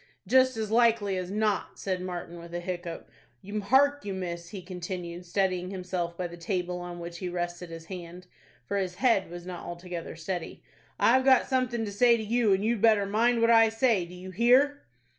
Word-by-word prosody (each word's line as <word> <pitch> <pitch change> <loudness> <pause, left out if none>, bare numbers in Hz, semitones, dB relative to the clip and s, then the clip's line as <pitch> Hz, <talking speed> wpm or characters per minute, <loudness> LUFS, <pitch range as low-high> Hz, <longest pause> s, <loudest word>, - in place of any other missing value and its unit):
"Just 260 -2 +4
as 220 -1 -3
likely 225 -4 +3
as 180 -1 -3
not," 210 0 -1
said 185 -2 -2
Martin, 175 -1 -6
with 170 0 -9
a - - -1
hiccough. 175 -1 -5 0.6
"Hark 285 +5 +4
you, 200 -2 -4
miss," 170 -2 -5
he 190 -1 -8
continued, 180 -1 -6
steadying 185 0 0
himself 180 -2 -4
by 180 - -2
the 175 0 -7
table 180 0 -2
on 175 0 -7
which 170 0 -7
he 180 - -3
rested 175 0 -4
his 165 0 -9
hand, 180 0 -9 0.4
for 200 - -2
his 185 -2 -2
head 230 -4 +2
was 175 0 -8
not 180 -1 -7
altogether 175 -1 -6
steady, 165 +1 -5 0.4
"I've 260 +3 +5
got 265 -1 +5
something 250 -3 0
to 205 - -5
say 235 +3 +4
to 220 - -4
you, 225 0 +2
and 195 +2 +2
you'd 230 -2 0
better 215 -3 +5
mind 230 +4 +2
what 230 0 +5
I 225 -1 +7
say? 225 -4 +2
Do 180 - -11
you 185 +1 -9
hear?" 255 +8 +4
185 Hz, 200 wpm, -28 LUFS, 175-225 Hz, 0.6 s, I